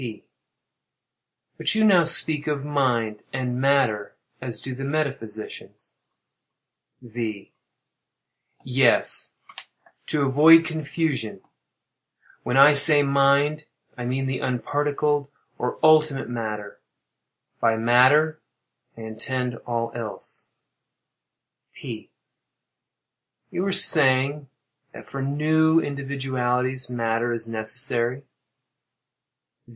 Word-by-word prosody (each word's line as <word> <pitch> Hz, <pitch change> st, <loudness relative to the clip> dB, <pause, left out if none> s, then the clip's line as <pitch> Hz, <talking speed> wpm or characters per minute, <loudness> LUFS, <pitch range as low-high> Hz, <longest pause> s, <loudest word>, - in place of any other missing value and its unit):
P. 115 Hz, -4 st, -8 dB, 1.4 s
But -, -, 0 dB
you 220 Hz, -, +2 dB
now 185 Hz, -6 st, +4 dB
speak 155 Hz, -2 st, +3 dB
of 145 Hz, -2 st, -3 dB
"mind" 120 Hz, -7 st, -1 dB
and 125 Hz, -1 st, -4 dB
"matter" 135 Hz, -7 st, 0 dB, 0.3 s
as 120 Hz, -3 st, -6 dB
do 130 Hz, -, -7 dB
the 135 Hz, +2 st, -8 dB
metaphysicians. 135 Hz, -7 st, -6 dB, 1.1 s
V. 110 Hz, -4 st, -7 dB, 1.1 s
Yes—to 130 Hz, +3 st, -1 dB
avoid 155 Hz, +5 st, +6 dB
confusion. 155 Hz, -7 st, -4 dB, 1.0 s
When 125 Hz, -, -2 dB
I 140 Hz, +2 st, +7 dB
say 145 Hz, +1 st, +7 dB
"mind," 140 Hz, +2 st, +1 dB, 0.3 s
I 125 Hz, -, -7 dB
mean 130 Hz, +2 st, -2 dB
the 130 Hz, -1 st, -3 dB
unparticled 145 Hz, +3 st, -2 dB, 0.3 s
or 125 Hz, -, -3 dB
ultimate 155 Hz, -3 st, +3 dB
matter; 105 Hz, -3 st, -6 dB, 0.8 s
by 115 Hz, -1 st, +1 dB
"matter," 130 Hz, +7 st, +3 dB, 0.6 s
I -, -, -10 dB
intend 120 Hz, +2 st, -5 dB
all 115 Hz, -1 st, -3 dB
else. 115 Hz, -3 st, -7 dB, 1.3 s
P. -, -, -9 dB, 1.4 s
You -, -, -3 dB
were 195 Hz, +1 st, -1 dB
saying 140 Hz, -3 st, +4 dB, 0.5 s
that -, -, -12 dB
"for 135 Hz, -, -7 dB
new 155 Hz, +3 st, +2 dB
individualities 130 Hz, -3 st, -3 dB
matter 115 Hz, 0 st, -2 dB
is 115 Hz, -1 st, -5 dB
necessary." 120 Hz, +3 st, -2 dB
135 Hz, 90 wpm, -23 LUFS, 120-145 Hz, 1.4 s, I